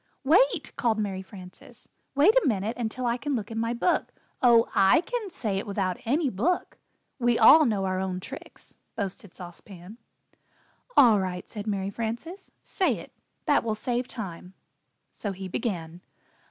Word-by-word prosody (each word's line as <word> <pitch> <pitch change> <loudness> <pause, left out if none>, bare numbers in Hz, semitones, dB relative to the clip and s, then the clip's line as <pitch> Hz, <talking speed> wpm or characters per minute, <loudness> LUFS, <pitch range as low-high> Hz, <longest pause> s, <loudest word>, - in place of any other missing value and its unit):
"Wait," 340 - +3
called 225 -2 +1
Mary 200 -3 -2
Frances, 195 +6 -13 0.3
"wait 300 +10 +6
a - - +3
minute 215 0 0
until 240 +1 -3
I 235 0 +1
can 285 +2 -2
look 220 -2 -4
in 225 - -3
my 230 +1 0
book 245 +9 0 0.2
" - - -41
"Oh, 235 -2 +5
I 195 +11 +5
can 455 +1 -4
say 210 - -2
it - - -7
without 195 -3 -2
any 285 +6 +1
book 265 - -1 0.4
we 240 -1 +2
all 305 +7 +8
know 205 -5 0
our 185 0 -1
own 185 -1 -2
tricks," - - -11 0.2
boasted 200 -2 -5
Sauce 175 -2 -10
Pan. 195 +3 -13 1.0
"All 230 -6 +7
right," 180 -1 -4
said 210 0 -7
Mary 200 -1 -2
Frances, 235 - -5
"say 380 - 0
it - - -11 0.3
that - - +3
will 220 -2 -1
save 245 +3 -2
time." 185 -5 -8 0.6
So 205 -2 -5
he 190 0 -7
began. 175 -5 -4
220 Hz, 165 wpm, -27 LUFS, 190-255 Hz, 1.0 s, all